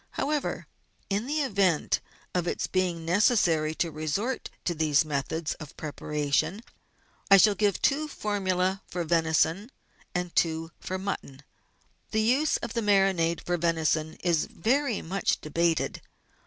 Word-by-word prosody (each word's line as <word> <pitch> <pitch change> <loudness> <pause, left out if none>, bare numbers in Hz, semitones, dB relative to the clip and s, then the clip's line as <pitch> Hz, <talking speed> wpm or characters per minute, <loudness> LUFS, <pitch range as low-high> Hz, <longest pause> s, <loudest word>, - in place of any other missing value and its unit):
How 280 - -1
ever, 300 -2 -2 0.5
in 205 +5 0
the 300 +2 0
event 195 - +1 0.3
of 175 -1 0
its - - -1
being 180 -3 -1
necessary 170 -5 +3
to 165 0 -1
resort 155 - -2 0.2
to 175 - +1
these 155 -2 +2
methods 150 +2 -2
of 155 -3 -10
preparation, 150 +5 -1 0.7
I 195 - +9
shall 210 +2 +6
give 200 0 +1
two 300 +2 +2
formulae 190 -6 -1
for 175 -1 -3
venison 165 +5 +1 0.5
and 180 -1 -2
two 165 0 +1
for 185 - -4
mutton. 185 -8 -5 0.7
The 220 - +1
use 260 +7 +2
of 225 - -6
the 230 - 0
marinade 195 -5 +2
for 175 0 0
venison 160 -1 0
is 170 -3 +2
very 250 +4 0
much 195 +4 0
debated. 165 +2 0
180 Hz, 140 wpm, -27 LUFS, 160-205 Hz, 0.7 s, I